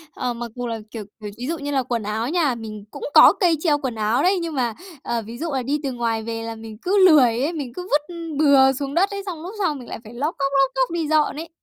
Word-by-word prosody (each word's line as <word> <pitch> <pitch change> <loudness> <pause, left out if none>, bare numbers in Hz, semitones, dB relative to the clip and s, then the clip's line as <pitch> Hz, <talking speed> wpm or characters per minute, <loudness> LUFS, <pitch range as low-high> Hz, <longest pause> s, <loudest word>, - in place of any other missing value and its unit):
Ờ, 250 -1 -2
mặc 235 -1 -6
dù 245 -1 -4
là, 230 -1 -3
kiểu 225 -3 -6 0.2
kiểu, 210 - -6
ví 245 +2 -5
dụ 330 +2 -2
như 290 0 -4
là 270 -2 +1
quần 235 -3 -2
áo 220 +4 -2
nhà 310 -6 +1
mình, 215 -2 -8
cũng 285 - -9
có - - +9
cây 345 -4 +3
treo 305 -4 +3
quần 260 -5 -4
áo 215 +2 +1
đấy, 370 0 +3
nhưng 330 -2 -4
mà, 245 -4 0 0.3
ờ, 235 -1 -1
ví 230 +2 -8
dụ 330 +4 -3
là 260 - -1
đi 285 +4 -1
từ 275 - -1
ngoài 230 -2 -2
về 225 0 -4
là 225 0 -5
mình 220 -1 -10
cứ 380 +1 +4
lười 250 -7 +5
ấy. 310 +6 0
Mình 270 -6 -5
cứ 360 - -6
vứt 300 +4 0 0.2
bừa 275 -3 +6
xuống 275 +1 -4
đất 380 +6 +3
ấy, 400 -1 -5
xong 350 -5 -6
lúc 365 +5 -7
sau 355 -6 +1
mình 250 -4 -9
lại - - -6
phải 220 - -12
lóc 290 +7 -2
cóc, 275 0 0
lóc 270 -1 +3
cóc 265 +3 +1
đi 330 -2 -1
dọn 305 -1 +2
ấy. 325 +3 -7
270 Hz, 290 wpm, -22 LUFS, 235-315 Hz, 0.3 s, có